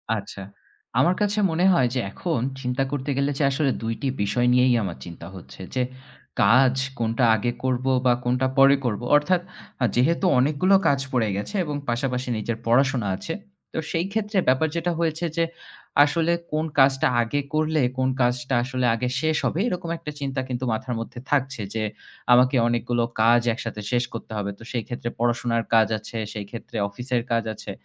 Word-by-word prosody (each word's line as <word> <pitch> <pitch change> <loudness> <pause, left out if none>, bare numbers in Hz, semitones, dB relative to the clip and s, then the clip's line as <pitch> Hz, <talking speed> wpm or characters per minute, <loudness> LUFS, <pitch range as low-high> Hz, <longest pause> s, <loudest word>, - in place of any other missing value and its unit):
আচ্ছা, 100 -1 -7 0.6
আমার 175 +7 +4
কাছে 205 +1 +1
মনে 175 +3 +1
হয় 130 -6 +3
যে - - +1
এখন 165 -3 -2 0.2
চিন্তা 125 +2 0
করতে 145 0 -3
গেলে 140 +1 +1
যে - - +2
আসলে 135 -1 +1
২ 115 0 -1
টি 140 - -1 0.2
বিষয় 120 +4 +1
নিয়েই 125 0 +4
আমার 90 -6 -4
চিন্তা 85 0 -9
হচ্ছে 95 +1 -12
যে 130 - +2 0.6
কাজ 125 +5 +5 0.3
কোনটা 115 +2 0
আগে 120 +3 -1
করব 130 0 0 0.2
বা 125 - +5
কোনটা 125 +2 +1
পরে 135 +1 +7
করব। 110 -1 -1
অর্থাৎ 175 +5 +3 0.5
যেহেতু 165 +9 +2
অনেকগুলো 155 +8 +3
কাজ 140 -1 +3
পড়ে 115 -4 +1
গেছে 105 - -4
এবং 150 -2 -4
পাশাপাশি 125 +1 -1
নিজের 115 +1 -3
পড়াশোনা 125 -2 +2
আছে। 165 +11 -5 0.4
তো - - -5
সেই 165 +2 0
ক্ষেত্রে 210 -1 -1
ব্যাপার 130 +5 +3
যেটা 170 +1 0
হয়েছে 165 +1 0
যে, 165 - +3 0.6
আসলে 165 +3 +1 0.2
কোন 155 +1 0
কাজটা 135 +3 +4
আগে 130 +5 -1
করলে 155 -1 +1 0.2
কোন 130 0 +1
কাজটা 125 +2 0
আসলে 130 -1 -2
আগে 125 +2 -2
শেষ 160 -1 +1
হবে 165 - 0
এরকম 180 -6 -3
একটা 150 -2 -7
চিন্তা 135 -1 -3
কিন্তু 125 +1 -3
মাথার 120 +2 -2
মধ্যে 115 +1 -7
থাকছে 135 -4 0
যে 110 -1 -1 0.5
আমাকে 125 +2 +5
অনেকগুলো 120 0 0 0.2
কাজ 120 +1 +5
একসাথে 110 -2 -6
শেষ 120 0 +2
করতে 115 - -8
হবে। 100 0 -2
তো - - -13
সেই 120 -3 -2
ক্ষেত্রে 120 -1 -4
পড়াশোনার 120 -1 +1
কাজ 110 -1 +6
আছে, 110 +2 -8 0.2
সেই 105 -2 -5
ক্ষেত্রে 115 -1 -8
অফিসের 125 +3 -2
কাজ 115 0 +2
আছে। - - -8
130 Hz, 180 wpm, -24 LUFS, 120-150 Hz, 0.6 s, পরে